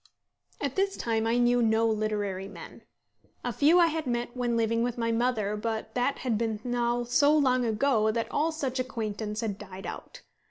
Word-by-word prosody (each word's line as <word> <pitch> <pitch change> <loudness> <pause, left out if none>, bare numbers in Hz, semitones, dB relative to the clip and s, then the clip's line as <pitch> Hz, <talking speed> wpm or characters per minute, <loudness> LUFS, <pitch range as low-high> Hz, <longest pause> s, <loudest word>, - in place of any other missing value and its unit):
At 280 -3 -3
this 390 0 0
time 225 -1 0
I 230 +1 +2
knew 245 0 +3
no 225 0 +3
literary 210 -3 -1
men. 200 - -11 0.6
A - - -2
few 310 +5 +5
I 345 - +7
had 320 -3 -2
met 240 0 -2
when 240 -2 0
living 230 0 +1
with 240 0 -1
my 230 -1 0
mother, 225 -3 0
but 220 +1 -4
that 250 +3 0
had 235 -5 -1
been 220 -2 -1
now 240 0 0
so 285 +5 +4
long 255 -4 +3
ago 220 -1 +2
that 230 +1 -1
all 315 +3 +1
such 270 -5 -3
acquaintance 215 -4 -3
had 205 -3 -3
died 190 -2 -9
out. - - -8
235 Hz, 190 wpm, -28 LUFS, 220-255 Hz, 0.6 s, I